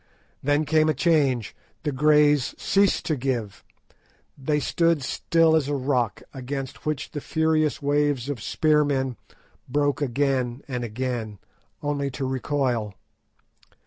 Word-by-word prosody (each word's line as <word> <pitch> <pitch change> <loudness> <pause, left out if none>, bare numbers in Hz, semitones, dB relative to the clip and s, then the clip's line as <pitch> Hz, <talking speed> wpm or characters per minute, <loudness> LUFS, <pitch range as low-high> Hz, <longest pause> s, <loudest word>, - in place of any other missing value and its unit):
Then 145 +2 +1
came 155 +1 +3
a 155 - +1
change; 135 -6 +1 0.3
the 150 - -1
Greys 150 0 +3
ceased 200 -1 +2
to 155 - 0
give; 120 -6 -3 0.7
they 150 +2 0
stood 165 +2 +1
still 165 +3 +2
as 150 -4 +1
a 145 - -1
rock, 130 -5 -1
against 135 +1 -6
which 150 -2 -2
the 145 - -5
furious 155 -1 +1
waves 145 -3 +1
of 140 -6 -4
spearmen 145 -3 +1 0.5
broke 145 +2 +1
again 130 -1 0
and 125 -3 -3
again, 115 -2 -3 0.5
only 145 -1 -1
to 135 - -2
recoil. 130 -5 -1
140 Hz, 125 wpm, -25 LUFS, 130-150 Hz, 0.7 s, came